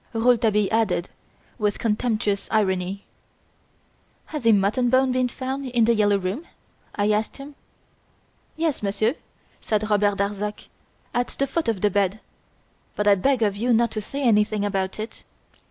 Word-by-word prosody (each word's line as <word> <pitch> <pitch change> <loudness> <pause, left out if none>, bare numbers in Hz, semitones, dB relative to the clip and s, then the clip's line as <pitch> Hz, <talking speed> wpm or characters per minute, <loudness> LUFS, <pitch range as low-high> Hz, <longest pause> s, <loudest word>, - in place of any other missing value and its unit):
Rouletabille 225 -3 +2
added 215 -6 +1 0.5
with 210 -1 0
contemptuous 215 -2 -1
irony. 190 -2 0 1.2
"Has 295 -7 -4
a - - +7
mutton 210 +5 +2
bone 260 +1 +3
been 255 0 +1
found 265 +2 -4
in 240 -2 +2
"The 235 - +4
Yellow 205 -2 +3
Room"?" 195 - -4 0.5
I 205 0 +1
asked 210 +1 -1
him. 280 +1 -10 1.0
"Yes, 320 -3 -1
Monsieur," 210 +3 +1 0.5
said 215 -1 -1
Robert 205 -1 +2
Darzac, 205 +1 -3 0.4
"at 245 0 0
the 275 - -2
foot 325 +1 -2
of 220 -5 -1
the 210 - +2
bed; 200 +1 +1 0.8
but 210 - -1
I 205 - +7
beg 235 +5 +2
of 205 -2 +1
you 240 +4 +1
not 230 0 +3
to 215 -1 -3
say 275 +7 -5
anything 210 -3 +2
about 195 -1 -2
it." 220 +2 -7
215 Hz, 155 wpm, -24 LUFS, 205-245 Hz, 1.2 s, a